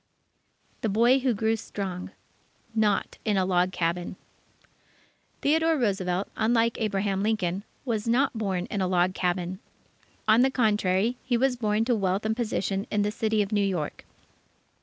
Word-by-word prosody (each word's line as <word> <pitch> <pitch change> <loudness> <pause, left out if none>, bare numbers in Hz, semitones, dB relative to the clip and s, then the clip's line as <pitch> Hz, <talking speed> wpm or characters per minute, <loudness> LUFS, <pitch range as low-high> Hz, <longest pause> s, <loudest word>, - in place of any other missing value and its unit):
THE 220 - 0
BOY 235 +6 +4
WHO 255 -3 +1
GREW 220 +2 +1
STRONG 195 -4 -5 0.6
Not 210 -3 0
in 210 -3 +1
a 190 - +2
Log 180 0 +2
Cabin 175 +1 -2 1.3
Theodore 320 +2 +3
Roosevelt, 195 -6 0
unlike 230 +1 +1
Abraham 195 -2 0
Lincoln, 200 -3 0 0.2
was 225 -3 -2
not 255 +3 +2
born 190 -5 -1
in 200 - -1
a 185 - +1
log 180 0 +2
cabin. 180 0 -2 0.7
On 220 +2 +6
the 265 - +4
contrary, 215 -2 +1
he 245 -2 +1
was 260 +1 +2
born 220 -2 0
to 245 - +2
wealth 195 0 0
and 220 0 +1
position 205 -4 -2
in 205 -1 +1
the 205 - 0
City 220 -1 +1
of 200 - -7
New 205 -1 +2
York. 180 -7 -2
210 Hz, 155 wpm, -27 LUFS, 190-230 Hz, 1.3 s, On